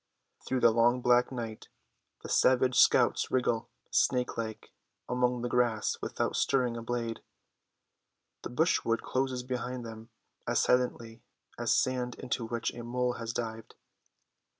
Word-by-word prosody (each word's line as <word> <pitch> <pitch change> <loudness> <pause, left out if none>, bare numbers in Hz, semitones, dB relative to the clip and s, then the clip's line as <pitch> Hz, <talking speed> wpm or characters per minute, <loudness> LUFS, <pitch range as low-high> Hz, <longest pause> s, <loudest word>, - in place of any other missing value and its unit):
Through 130 -1 0
the 115 - +6
long 120 +2 +3
black 125 +1 +3
night 115 -4 -6 0.6
the - - -6
savage 130 0 +3
scouts - - +4
wriggle, 120 -3 0 0.2
snake 125 -1 +1
like, 110 -1 -5 0.4
among 125 -1 0
the - - 0
grass 120 -3 +1
without - - -2
stirring 125 -3 +1
a 115 - -5
blade. 115 -1 -3 1.2
The - - -6
brushwood 120 -4 +1
closes 130 -1 -1
behind 125 -1 -4
them, 115 0 -9 0.4
as - - +2
silently 120 -2 0 0.4
as 120 -1 0
sand 125 -2 +1
into 125 -2 -3
which 115 0 -2
a 120 - -7
mole 125 +1 -1
has 115 -1 -3
dived. 115 -1 -5
120 Hz, 135 wpm, -30 LUFS, 115-125 Hz, 1.2 s, the